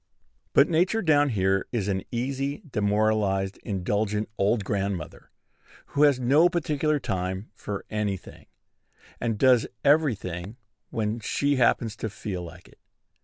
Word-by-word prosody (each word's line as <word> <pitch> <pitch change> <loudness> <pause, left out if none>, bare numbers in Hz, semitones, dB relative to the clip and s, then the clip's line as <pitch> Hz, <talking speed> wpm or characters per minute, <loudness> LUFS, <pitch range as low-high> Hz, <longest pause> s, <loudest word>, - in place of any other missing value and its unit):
But 140 - +6
Nature 180 +7 +1
down 145 -3 +4
here 95 -4 +1
is 110 -5 -1
an 95 -2 0
easy, 135 +4 -2
demoralized, 105 -4 +1
indulgent 105 +2 -1
old 105 +2 +1
grandmother, 100 -6 -3 0.6
who 145 - +1
has 145 -3 +5
no 145 +8 +4
particular 155 -3 0
time 95 -1 -3
for 100 -1 -6
any 105 -2 -1
thing, - - -15 0.7
and 115 -3 -1
does 125 -1 +4 0.2
every 145 -3 +4
thing 90 +3 -7 0.3
when 110 0 -2
she 140 +5 0
happens 115 -2 +2
to 110 - -3
feel 95 -3 -5
like 90 +1 -11
it. - - -21
110 Hz, 135 wpm, -26 LUFS, 100-140 Hz, 0.7 s, But